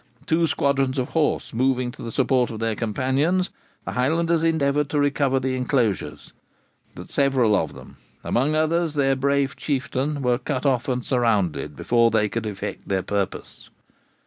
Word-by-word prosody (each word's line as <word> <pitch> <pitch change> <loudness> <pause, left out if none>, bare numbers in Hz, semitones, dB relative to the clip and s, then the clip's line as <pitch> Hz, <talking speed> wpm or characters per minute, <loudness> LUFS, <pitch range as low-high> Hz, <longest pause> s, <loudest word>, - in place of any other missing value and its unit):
Two 165 +1 +2
squadrons 135 -3 0
of 130 -1 -1
horse 160 -2 0
moving 125 +1 +1
to - - -13
the 115 - -5
support 130 0 +2
of 110 - -6
their 115 0 0
companions, 135 - 0 0.3
the - - -3
Highlanders 165 +6 +1
endeavoured 150 -3 +1
to 145 - 0
recover 140 -2 +2
the 130 0 -1
enclosures. 125 - -1 0.6
But - - -10
several 130 -6 +3
of - - -1
them, - - -13 0.3
amongst 140 +6 +1
others 160 0 +1
their 135 -2 +2
brave 140 0 +1
Chieftain, 140 0 -2
were 125 -1 +2
cut 130 0 -3
off 130 0 +1
and 125 -2 -1
surrounded 100 - 0
before 115 +6 +3
they 105 -2 +1
could 115 0 -3
effect 100 -2 -6
their 95 -2 0
purpose. 100 -2 -4
130 Hz, 160 wpm, -23 LUFS, 120-145 Hz, 0.6 s, several